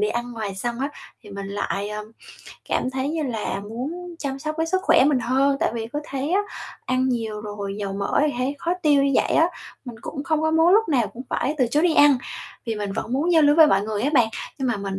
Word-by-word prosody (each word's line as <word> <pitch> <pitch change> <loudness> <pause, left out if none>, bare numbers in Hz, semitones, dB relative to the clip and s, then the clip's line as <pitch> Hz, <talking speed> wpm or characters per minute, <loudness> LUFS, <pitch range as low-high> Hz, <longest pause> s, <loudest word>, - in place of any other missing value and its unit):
đi 420 - +2
ăn 240 0 -3
ngoài 215 -4 -4
xong 235 +5 -3
á 275 - 0 0.3
thì - - -13
mình 200 0 -6
lại, 200 0 -2
ờ, 210 0 -5 0.6
cảm 255 - 0
thấy 265 +1 -2
như 315 +1 -1
là 225 -7 -2
muốn 290 - -6
chăm 275 -3 -3
sóc 305 +2 -4
cái 325 - +1
sức 375 +3 +1
khỏe 325 - +5
mình 285 -2 +3
hơn, 265 +4 +2
tại - - +2
vì 225 -1 -3
cứ 295 - -1
thấy 275 +1 -3
á 390 - +4 0.5
ăn 255 +1 +1
nhiều 225 -4 -2
rồi 205 -1 -5
dầu 200 -2 -3
mỡ 200 +6 0
thì 295 - 0
thấy 260 +3 -1
khó 335 - -1
tiêu 290 -3 +4
như 280 - +2
vậy - - +2
á. 325 - +5 0.4
Mình 245 -3 -8
cũng 280 +2 -6
không 315 -2 0
có 315 - +2
muốn 320 +1 +4
lúc 445 +1 +3
nào 255 -8 +2
cũng 245 - -9
phải 290 - 0
từ 255 - +3
chối 290 +6 +1
đi 345 -2 +3
ăn, 290 -3 +6 0.5
vì 230 -3 -2
mình 205 -2 -3
vẫn 225 - -4
muốn 305 +7 +1
giao 320 -2 +6
lưu 290 0 +5
với 320 -1 +9
mọi 200 -9 +3
người 210 0 -3
á 280 - +1
bạn, 240 -5 +5 0.3
nhưng 265 -2 -1
mà 245 - 0
mình 195 -1 -4
260 Hz, 260 wpm, -23 LUFS, 215-300 Hz, 0.6 s, với